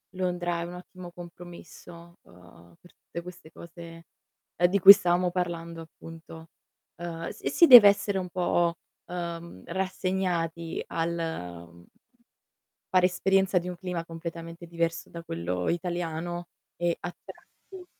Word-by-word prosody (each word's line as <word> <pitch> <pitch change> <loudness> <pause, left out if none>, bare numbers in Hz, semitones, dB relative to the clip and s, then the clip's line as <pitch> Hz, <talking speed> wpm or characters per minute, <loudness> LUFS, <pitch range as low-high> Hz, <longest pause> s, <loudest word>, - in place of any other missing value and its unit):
Londra 175 -2 -1
è - - -2
un 175 +1 -7
ottimo 180 0 -11
compromesso, 170 0 -12
ehm, 85 -1 -18
per 175 - -20
tutte 170 - -9
queste 175 -2 -12
cose, 170 0 -12 0.5
ehm, 175 - +4
di 200 +3 +1
cui 195 +2 +12
stavamo 180 -2 +1
parlando, 170 -2 -3
appunto. 165 0 -12 0.5
Ehm, 165 -1 -5
s - - -15
e - - 0
si 340 - +5
deve 240 -7 +11
essere 200 0 0
un 180 -1 -3
po', 175 -1 +1 0.3
ehm, 170 - -6
rassegnati 180 -3 -2
al 90 - -4 1.0
fare 185 -2 +4
esperienza 190 +1 +2
di 175 +1 -6
un 180 - -5
clima 180 -2 -4
completamente 165 +1 -8
diverso 165 0 -2
da 170 - -8
quello 90 - -3
italiano 175 0 -3 0.3
e 175 -1 0
a 175 - -6
tratti 375 -2 -14
170 Hz, 135 wpm, -27 LUFS, 165-180 Hz, 1.0 s, cui